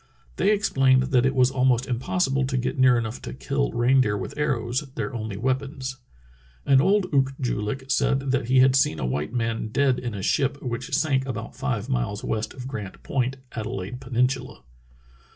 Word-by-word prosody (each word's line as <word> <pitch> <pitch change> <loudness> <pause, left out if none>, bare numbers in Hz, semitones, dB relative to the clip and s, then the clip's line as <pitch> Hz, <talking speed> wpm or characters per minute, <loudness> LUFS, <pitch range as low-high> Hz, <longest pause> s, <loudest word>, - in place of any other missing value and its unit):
They - - +2
explained 135 -10 +3
that 125 0 +4
it 135 - -1
was 130 0 +4
al 130 -1 -1
most 125 -1 +3
impossible 135 +1 0
to 130 - -1
get 125 - -1
near 130 -1 +6
enough 115 0 -3
to - - -7
kill - - -1
reindeer 120 -3 +3
with 95 - -6
arrows, 130 -3 -1
their - - -3
only 110 -4 -4
weapons." 130 +2 -2 0.7
An 135 -1 +5
old 195 +4 +3
Ook 135 -1 +2
joo 125 -5 -1
lik 105 +6 -3
said 135 +1 +1
that 130 -3 0
he 130 +1 +5
had 130 0 +5
seen 135 -11 +3
a 65 - -3
white 75 +9 -2
man 115 -2 -1
dead 130 +3 +1
in 120 -3 -4
a 95 - -5
ship 140 +6 +1
which 125 +1 -3
sank 135 -3 +1
about 115 -3 -5
five 125 -5 -2
miles 120 -6 -2
west 110 0 -3
of 130 -1 -7
Grant 105 -8 -7
Point, 130 0 -1
Adelaide 110 +1 -5
Peninsula. 125 - -1
130 Hz, 190 wpm, -25 LUFS, 115-135 Hz, 0.7 s, near